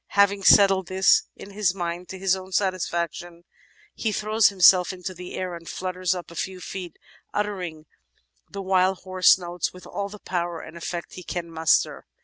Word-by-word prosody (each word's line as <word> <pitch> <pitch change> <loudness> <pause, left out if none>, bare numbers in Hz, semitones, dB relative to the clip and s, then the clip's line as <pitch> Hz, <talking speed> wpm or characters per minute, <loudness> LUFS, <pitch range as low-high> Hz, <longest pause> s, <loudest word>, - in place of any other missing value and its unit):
Having 200 -1 +3
settled 195 -3 +6
this 190 +1 +3
in 200 - -11
his 195 -2 0
mind 175 0 -4
to 190 - -7
his 190 0 +2
own 190 0 -9
satisfaction, 175 -2 -2 0.5
he 220 - -2
throws 215 +1 +3
himself 185 -2 +5
into 185 0 -6
the 180 0 -9
air 185 -1 -3
and 170 -1 -9
flutters 185 0 -2
up 175 -1 -8
a - - -12
few 190 +1 -4
feet, 180 -2 -7 0.4
uttering 180 -7 -3 0.6
the 200 -1 -6
while 190 0 +2
hoarse 185 -1 +4
notes 175 -1 -4
with 180 - -13
all 200 0 -4
the 210 - -10
power 175 -3 -3
and 160 +1 -11
effect 170 0 -6
he 180 - -9
can 170 0 -5
muster. 160 -1 +1
185 Hz, 175 wpm, -24 LUFS, 175-195 Hz, 0.6 s, settled